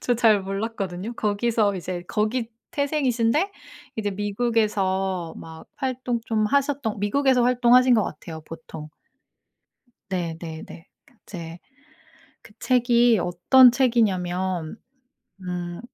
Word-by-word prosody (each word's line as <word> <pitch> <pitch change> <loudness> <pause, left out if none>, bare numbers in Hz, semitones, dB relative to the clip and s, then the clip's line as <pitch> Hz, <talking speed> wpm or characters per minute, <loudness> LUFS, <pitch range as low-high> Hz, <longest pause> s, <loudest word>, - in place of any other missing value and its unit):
저 245 - +1
잘 220 -3 +4
몰랐거든요. 195 0 -4
거기서 210 -1 0
이제 180 -1 -5
거기 225 +2 -1 0.2
태생이신데 285 - 0 0.5
이제 205 -2 -2
미국에서 195 -4 -1
막 160 0 -11
활동 255 -3 -2
좀 215 -2 +1
하셨던 275 -5 0
미국에서 255 +4 +2
활동하신 250 0 +5
것 215 - +3
같아요 160 +1 -8
보통. 160 -1 -10 1.2
네네네. 165 -2 -6 0.4
이제 170 -2 -8 0.8
그 210 - -17
책이 240 -3 +3
어떤 245 +9 +6
책이냐면 190 - 0 0.7
음 175 -1 -5
215 Hz, 230 characters per minute, -24 LUFS, 180-245 Hz, 1.2 s, 어떤